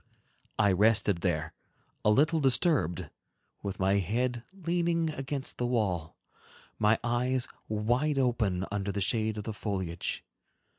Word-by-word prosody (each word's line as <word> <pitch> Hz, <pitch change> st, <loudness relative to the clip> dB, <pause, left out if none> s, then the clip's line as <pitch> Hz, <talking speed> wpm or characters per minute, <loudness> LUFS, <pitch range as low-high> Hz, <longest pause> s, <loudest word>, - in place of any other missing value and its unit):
I 105 Hz, -2 st, +4 dB
rested 105 Hz, 0 st, +4 dB
there, 80 Hz, -3 st, -1 dB, 0.5 s
a -, -, +4 dB
little 155 Hz, +9 st, +4 dB
disturbed, 120 Hz, -, +1 dB, 0.5 s
with 100 Hz, -1 st, -4 dB
my 95 Hz, +1 st, +3 dB
head 120 Hz, +5 st, -1 dB
leaning 170 Hz, -3 st, 0 dB
against 135 Hz, -1 st, -4 dB
the 120 Hz, -, +1 dB
wall, 95 Hz, -9 st, -1 dB, 0.6 s
my 110 Hz, +1 st, +4 dB
eyes 120 Hz, +1 st, 0 dB, 0.2 s
wide 120 Hz, +8 st, +1 dB
open, 110 Hz, -8 st, +1 dB
under 100 Hz, -1 st, -1 dB
the 100 Hz, -, -3 dB
shade 110 Hz, +2 st, 0 dB
of 105 Hz, -, -4 dB
the 110 Hz, -, -4 dB
foliage. 95 Hz, -5 st, -3 dB
110 Hz, 130 wpm, -30 LUFS, 100-130 Hz, 0.6 s, I